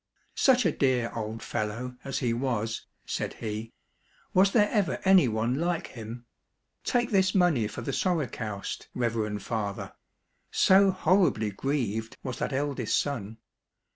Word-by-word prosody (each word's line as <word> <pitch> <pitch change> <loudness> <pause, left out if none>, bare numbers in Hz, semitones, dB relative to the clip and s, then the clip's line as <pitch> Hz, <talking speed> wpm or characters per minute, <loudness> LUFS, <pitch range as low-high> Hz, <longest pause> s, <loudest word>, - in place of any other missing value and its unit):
" - - -42
Such 255 -4 +4
a 165 - +4
dear 130 -5 +1
old 110 0 -4
fellow 115 +4 -3
as 135 - -3
he 115 - +2
was! 115 -3 -2
" - - -47
said - - -3
he; 110 +1 -5 0.3
" - - -35
was 190 +1 +5
there 210 -2 +4
ever 205 -5 +1
any 190 -7 +6
one 110 +2 0
like 170 0 0
him? 115 +1 -8 0.6
Take 245 -1 +1
this 190 -1 +3
money 165 - +3
for 105 - -7
the - - -3
sorokoust, 125 - -2
reverend 110 -4 -1
father! 105 -4 -3 0.3
" - - -46
so 195 +1 +5
horribly 175 - +2
grieved 115 -2 -2
was 130 -2 -4
that - - -1
eldest 135 -4 0
son. 115 -7 -3
125 Hz, 155 wpm, -28 LUFS, 110-175 Hz, 0.6 s, any